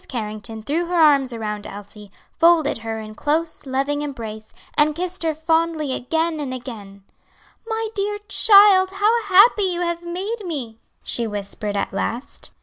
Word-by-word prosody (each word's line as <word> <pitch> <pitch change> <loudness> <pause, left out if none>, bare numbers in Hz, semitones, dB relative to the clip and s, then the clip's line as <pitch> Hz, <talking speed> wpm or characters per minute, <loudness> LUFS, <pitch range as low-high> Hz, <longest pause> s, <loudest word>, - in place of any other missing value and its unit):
Carrington 220 -1 -6
threw 325 +7 -1
her 355 - -2
arms 280 -5 +4
around 210 -3 -5
Elsie, 205 0 -11 0.3
folded 330 -6 +4
her 225 0 -5
in 215 0 -9
close, 305 +4 -2
loving 275 +2 -1
embrace, 220 -7 -7 0.2
and 300 0 +2
kissed 365 +2 -2
her 320 -2 0
fondly 320 -2 0
again 320 +5 -1
and 265 -3 -4
again, 205 -6 -9 0.6
"My 445 -1 -2
dear 415 0 -2
child, 400 -3 +6
how 425 +4 +2
happy 405 +3 +6
you 360 -3 0
have 340 -1 -2
made 385 +6 -5
me!" 260 - -6 0.2
she 235 -1 -1
whispered 205 0 -4
at 200 - -2
last. 235 +6 -4
295 Hz, 150 wpm, -21 LUFS, 225-350 Hz, 0.6 s, child